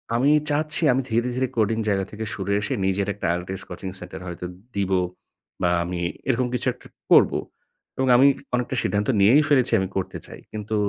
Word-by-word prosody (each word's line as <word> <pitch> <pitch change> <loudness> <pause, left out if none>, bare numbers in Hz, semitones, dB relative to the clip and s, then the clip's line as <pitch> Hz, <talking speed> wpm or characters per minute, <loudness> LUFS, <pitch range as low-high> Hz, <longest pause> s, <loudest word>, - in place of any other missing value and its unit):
আমি 135 +5 +3 0.2
চাচ্ছি 150 +2 0
আমি 130 - +1
ধীরে-ধীরে 125 +3 0
কোডিং 110 0 +2
জায়গা 95 -1 +1
থেকে 110 +1 -5
সরে 100 0 -2
এসে - - -2
নিজের 95 +1 0
একটা 100 -1 -7
IELTS 95 +2 -5
কোচিং 95 +1 -6
সেন্টার 90 - -8
হয়তো 90 0 -6 0.3
দিবো 95 -2 +1 0.6
বা 90 - +3
আমি 90 0 -4 0.3
এরকম 125 0 +2
কিছু 125 - -2
একটা - - -17 0.2
করবো। - - +6 0.6
এবং 130 - +1
আমি 135 +2 +6 0.2
অনেকটা 125 +2 -2
সিদ্ধান্ত 100 +2 0
নিয়েই 130 +10 +6
ফেলেছি 130 -4 +3
আমি 95 - -1
করতে 95 - -3
চাই। - - -11
কিন্তু 110 0 -4
105 Hz, 175 wpm, -24 LUFS, 95-125 Hz, 0.6 s, করবো